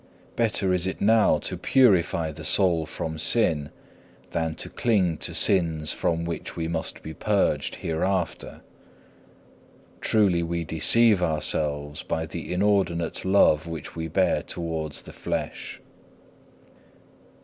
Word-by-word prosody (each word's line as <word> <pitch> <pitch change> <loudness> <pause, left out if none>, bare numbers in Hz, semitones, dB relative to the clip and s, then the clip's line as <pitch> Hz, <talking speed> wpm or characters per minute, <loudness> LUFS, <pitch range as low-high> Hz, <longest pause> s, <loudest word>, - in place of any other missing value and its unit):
Better 105 -5 +1
is 90 0 +1
it 95 - -4
now 110 +1 +4
to - - -3
purify 90 -10 +3
the 80 +1 -10
soul 85 -2 +2
from 80 -1 -5
sin, 80 -5 +2 0.6
than 80 -1 -2
to - - -4
cling 95 -8 +1
to - - -2
sins 80 -5 +2
from 85 0 -1
which 85 -1 -5
we 80 -1 -3
must 80 -1 -4
be 80 - -7
purged - - 0
hereafter. 90 +2 -2 1.4
Truly 100 -6 +2
we 85 0 -2
deceive 105 +6 +3
ourselves 75 -2 -1
by 80 0 -3
the 80 +1 -7
inordinate 90 -3 0
love 85 -5 +4
which 80 -3 -7
we 80 -1 -4
bear 95 +4 +1
towards 80 -3 -4
the - - -12
flesh. - - -5
85 Hz, 125 wpm, -25 LUFS, 80-95 Hz, 1.4 s, now